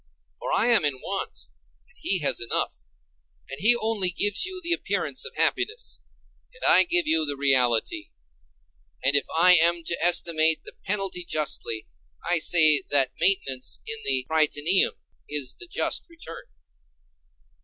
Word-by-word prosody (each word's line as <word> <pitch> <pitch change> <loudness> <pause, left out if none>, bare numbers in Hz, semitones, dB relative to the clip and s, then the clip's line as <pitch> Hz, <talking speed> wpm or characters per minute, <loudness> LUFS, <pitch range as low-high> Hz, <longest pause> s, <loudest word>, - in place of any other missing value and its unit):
For - - -5
I 210 - +1
am 235 -7 +3
in 145 -2 0
want, 195 +7 -5 0.5
and 485 - -23
he 195 - -2
has 145 - +2
enough; 120 - -2 0.8
and 135 - -7
he 230 +4 +4
only 220 -5 +1
gives 205 - 0
you 375 0 -7
the 345 -1 -2
appearance 400 - -3
of 465 - -8
happiness, 470 +3 -2 0.5
and - - -15
I - - +5
give 350 0 +2
you 160 0 +2
the 145 -2 -3
reality. 125 -6 0 0.9
And 140 - +2
if 140 - +2
I 180 +2 +6
am 170 0 +2
to 170 - -2
estimate 165 -2 +3
the - - -9
penalty 195 -3 -2
justly, 145 -9 -3 0.4
I 175 -1 +1
say 155 -2 +4
that 135 -3 +3
maintenance 135 -9 0
in 225 0 -4
the 130 -2 0
Prytaneum 160 +3 +2 0.3
is 145 -4 -2
the 360 - -9
just - - -2
return. 335 - -11
170 Hz, 150 wpm, -24 LUFS, 145-220 Hz, 0.9 s, I